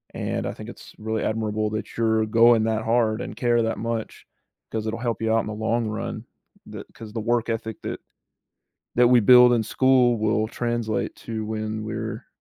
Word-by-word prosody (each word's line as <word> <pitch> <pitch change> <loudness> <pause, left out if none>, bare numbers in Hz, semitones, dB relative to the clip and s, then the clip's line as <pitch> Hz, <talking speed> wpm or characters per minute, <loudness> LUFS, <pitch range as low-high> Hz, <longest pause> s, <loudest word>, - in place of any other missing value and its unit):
and - - -3
I - - -4
think - - -9
it's - - -12
really 110 0 -3
admirable 110 -1 -1
that 110 0 -5
you're 110 -1 +2
going 115 +1 +5
that 110 0 0
hard 115 -1 +1
and - - -6
care 120 0 +2
that 115 0 -1
much, 115 0 -4 0.5
'cause 110 0 -3
it'll 110 +1 -3
help 115 -3 -2
you 110 0 0
out 115 - +3
in - - -7
the 105 - -4
long 110 +2 -1
run. 105 0 -5 0.4
The - - -8
'cause 110 -1 -10
the 115 - -3
work 120 +1 0
ethic 110 -1 -4
that - - -4 1.0
that 120 0 +6
we 125 -1 +6
build 125 +2 +7
in 115 - +1
school 125 +1 +3
will 110 0 +1
translate 120 -3 -2
to 110 -1 -6
when 110 0 -4
we're 110 0 -5
110 Hz, 195 wpm, -24 LUFS, 110-120 Hz, 1.0 s, build